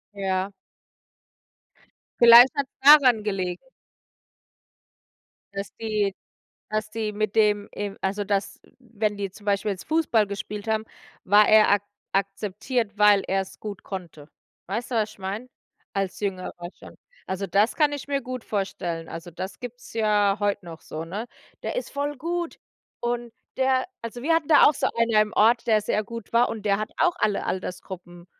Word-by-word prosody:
Ja. 190 0 -1 1.7
Vielleicht 235 +2 +10
hat's 280 -1 -1
daran 270 -7 +7
gelegen 185 0 -3 1.9
dass 200 0 -6
die 210 -3 -1 0.6
dass 215 0 -2
die 215 -1 -3
mit 215 0 -2
dem 210 -1 +3
e 205 -1 -3
also 200 +2 -1
dass, 200 0 -2 0.2
wenn 215 -4 -3
die 200 -2 -3
zum 205 +2 -16
Beispiel 205 +1 +1
jetzt 190 - -5
Fußball 295 -10 +2
gespielt 205 +2 -6
haben, 220 0 0 0.4
war 205 +2 +5
er 215 -1 +6
ak 205 0 +3 0.3
akzeptiert, 205 +3 -2
weil 210 -1 +6
er's 195 0 -2
gut 205 -3 -7
konnte. 170 -6 -8 0.4
Weißt 225 +7 -4
du, 240 - -1
was 215 -1 0
ich - - -20
meine? 200 +6 -5 0.5
Als 195 0 -2
Jüngerer 190 -3 -3 0.3
schon. - - -13 0.3
Also, 190 +1 -3
das 200 +5 +2
kann 300 -2 +3
ich 285 -1 -5
mir 280 -1 0
gut 255 -2 -6
vorstellen. 180 -5 -3
Also, 165 +1 -8
das 185 +4 -7
gibt's 245 -1 -9
ja 210 -3 +2
heut 205 -1 0
noch 165 -2 -10
so, 160 +1 -6
ne? 205 +8 -5 0.4
„Der - - -3
ist - - -3
voll 285 +1 -3
gut! 345 +2 -3 0.4
Und 240 -1 -3 0.2
der“ 260 +1 +2 0.2
Also, 230 +1 -6
wir 325 +4 +2
hatten 325 -2 0
da 300 - +7
auch 295 - +5
so - - 0
einer 230 -2 +4
im 210 0 -5
Ort, 235 +3 +4
der 215 -2 +4
sehr 210 0 0
gut 230 -1 -9
war, 240 +1 +5
und 215 -2 -6
der 200 0 +3
hat 215 +2 -4
auch 355 -1 +3
alle 210 - 0
Altersgruppen 180 -1 -6
210 Hz, 165 wpm, -25 LUFS, 195-235 Hz, 1.9 s, Vielleicht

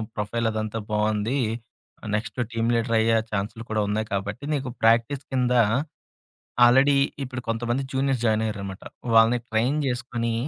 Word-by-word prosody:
Profile 115 +2 -1
అదంతా 110 0 -3
బావుంది. 105 +4 0 0.8
Next 110 +4 -4
team 115 0 0
leader 115 0 +1
అయ్యే 115 0 +3
ఛాన్సులు 105 +3 -3
కూడా 110 -1 0
ఉన్నాయి 110 +1 -1
కాబట్టి, 100 +6 -3
నీకు 135 -3 -2
ప్రాక్టీస్ 115 +5 +3
కింద" 125 -1 +2 1.1
ఆల్రెడీ 135 +4 +5 0.3
ఇప్పుడు 130 -1 -5
కొంతమంది 120 +3 -1
జూనియర్స్ 135 -2 0
జాయినయ్యారనమాట. 105 -3 -1 0.3
"వాళ్ళని 115 +2 +5
ట్రైన్ 120 +6 +1
జేసుకొని, 120 -2 -2
115 Hz, 125 wpm, -25 LUFS, 110-125 Hz, 1.1 s, ఆల్రెడీ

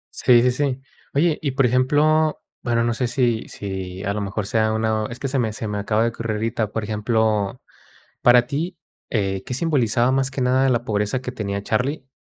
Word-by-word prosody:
Sí, 120 -1 +5
sí, 125 - +4
sí. 135 0 -1 0.4
Oye, 155 +2 +2
y 140 - -1
por 135 0 +2
ejemplo, 150 +5 +3 0.2
bueno, 115 -1 +1
no 120 - +1
sé 120 +1 -1
si 120 -3 0
si 95 -1 -6
a 100 - -1
lo 105 - -3
mejor 100 0 -3
sea 110 +1 +1
una 110 -1 0
es 120 - -7
que 135 - -3
se 135 0 -1
me 115 -3 0
se 110 0 -5
me 105 0 -3
acaba 105 +2 +1
de 115 - +2
ocurrir 115 -1 -4
ahorita. 110 -1 -1
Por 110 -1 -3
ejemplo, 110 0 0 0.6
para 120 0 +6
ti, 165 +6 -3 0.3
eh, 95 -4 -1
¿qué - - -6
simbolizaba 125 -4 +2
más 135 0 +1
que 135 - -4
nada 130 +1 +3
la 120 -1 +1
pobreza 105 +2 -1
que 125 -1 -5
tenía 100 -4 -3
Charlie, 130 +6 -1
120 Hz, 205 wpm, -22 LUFS, 105-130 Hz, 0.6 s, para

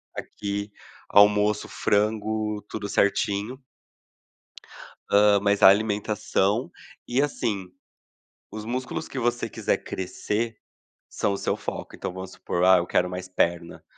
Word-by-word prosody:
aqui”. 100 0 -5 0.4
Almoço 105 +1 +5
frango, 105 0 0
tudo 105 -2 -4
certinho. 100 +5 0 1.5
Hã, 100 0 +5
mas 100 0 +1
a - - +10
alimentação, 105 0 +1 0.4
e 125 +3 +1
assim, 100 -10 -2 0.8
os 110 0 -7
músculos 125 +3 -4
que 135 - -5
você 120 -1 0
quiser - - -1
crescer, 105 +4 -3 0.5
são 100 - -1
o - - -2
seu - - -1
foco. - - -6
Então - - -5
vamos 95 0 -7
supor: 90 - -3
“Ah, 95 0 +7
eu 85 - 0
quero 90 +1 +1
mais 90 0 -6
perna”, 85 -2 -1
105 Hz, 125 wpm, -25 LUFS, 95-110 Hz, 1.5 s, a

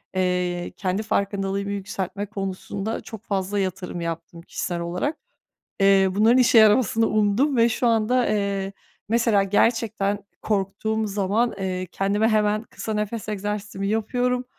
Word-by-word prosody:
eee, 180 -1 0
kendi 190 +2 -1
farkındalığımı 200 -1 -1
yükseltme 200 0 -4
konusunda 195 +1 -4
çok 220 -1 -10
fazla 200 0 -1
yatırım 185 -2 -3
yaptım 170 0 -5
kişisel 175 0 -4
olarak. 180 - -2 0.6
Eee, 195 -1 +5
bunların 220 +6 +4
işe 245 -2 +5
yaramasını 220 +1 +5
umdum 215 +6 +2
ve 230 +1 +5
şu 240 +2 0
anda, 230 +2 +2
eee, 200 -2 -1 0.4
mesela 230 -3 +3
gerçekten 205 -1 +1 0.2
korktuğum 215 +2 -1
zaman, 205 +4 0
eee, 185 -1 -3
kendime 205 +3 +1
hemen 215 0 +2
kısa 220 -1 -6
nefes 210 +1 -3
egzersizimi 205 -1 -3
yapıyorum. 245 +4 0
205 Hz, 130 wpm, -24 LUFS, 195-220 Hz, 0.6 s, Eee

